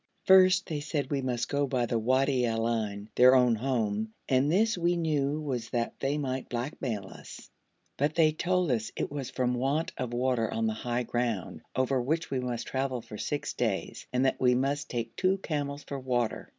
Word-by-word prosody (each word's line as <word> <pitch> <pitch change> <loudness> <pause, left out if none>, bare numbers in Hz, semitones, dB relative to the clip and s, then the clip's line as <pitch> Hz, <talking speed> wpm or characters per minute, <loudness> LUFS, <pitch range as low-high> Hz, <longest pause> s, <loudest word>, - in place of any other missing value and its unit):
First 185 -1 +6
they 155 -2 -2
said 145 -2 -3
we 140 -1 0
must 120 -2 -1
go 140 0 0
by 125 -2 0
the 115 0 0
Wadi 130 +2 +2
al 115 0 0
Ain, 105 -3 -2
their 125 +1 +7
own 125 -2 +5
home, 110 -3 -1
and 135 +3 +3
this 220 +5 +3
we 175 0 +1
knew 150 -3 0
was 130 -7 -3
that 120 -1 -1
they 140 +2 0
might 130 -3 -3
blackmail 120 -4 -3
us; - - -12 0.5
but 145 +2 0
they 155 -2 +5
told 180 0 0
us 110 -3 -1
it - - -3
was 140 -3 -4
from 125 -1 0
want 135 +6 0
of 125 -2 -2
water 120 -2 0
on 115 - -1
the 110 - +1
high 120 +2 -2
ground, 120 -5 -2
over 130 0 +1
which 160 +6 -1
we 135 - 0
must 125 -2 -3
travel 130 -3 -2
for 105 -3 -9
six 145 - -2
days, 110 -6 -2
and 125 +1 +1
that 130 - 0
we 125 -1 +4
must 140 +3 -1
take 115 -2 -4
two 190 +1 +2
camels 145 -5 -3
for 140 - -5
water. 120 -3 -1
130 Hz, 200 wpm, -29 LUFS, 120-145 Hz, 0.5 s, their